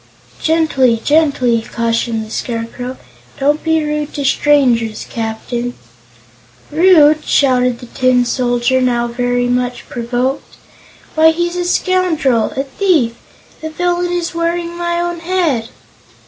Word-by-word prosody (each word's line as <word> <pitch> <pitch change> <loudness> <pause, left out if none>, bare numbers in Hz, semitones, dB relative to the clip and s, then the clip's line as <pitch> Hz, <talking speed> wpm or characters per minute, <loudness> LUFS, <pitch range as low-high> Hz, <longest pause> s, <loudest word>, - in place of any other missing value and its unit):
"Gently 310 -7 +2
gently!" 280 -7 +2
cautioned 230 -1 -2
the 215 - -13
Scarecrow; 240 +2 -5 0.4
"don't 290 +2 +1
be 320 -1 +1
rude 300 0 -2
to 285 - -3
strangers, 250 -6 +2
Captain." 235 +2 -4 1.0
"Rude?" 310 -2 +5
shouted 250 -4 +2
the 245 - -11
Tin 255 0 +1
Soldier, 245 +1 +1
now 240 -2 +1
very 245 +1 -1
much 245 0 -2
provoked; 245 +3 -3 0.6
"why, 320 0 +5
he's 345 +2 -1
a 355 0 -2
scoundrel 335 - +1
a 270 - -1
thief! 280 -4 +1 0.5
The 315 - -4
villain 350 +2 -1
is 350 -1 -2
wearing 335 0 -2
my 345 0 -2
own 345 0 -2
head!" 330 -10 -1
270 Hz, 120 wpm, -16 LUFS, 245-330 Hz, 1.0 s, Rude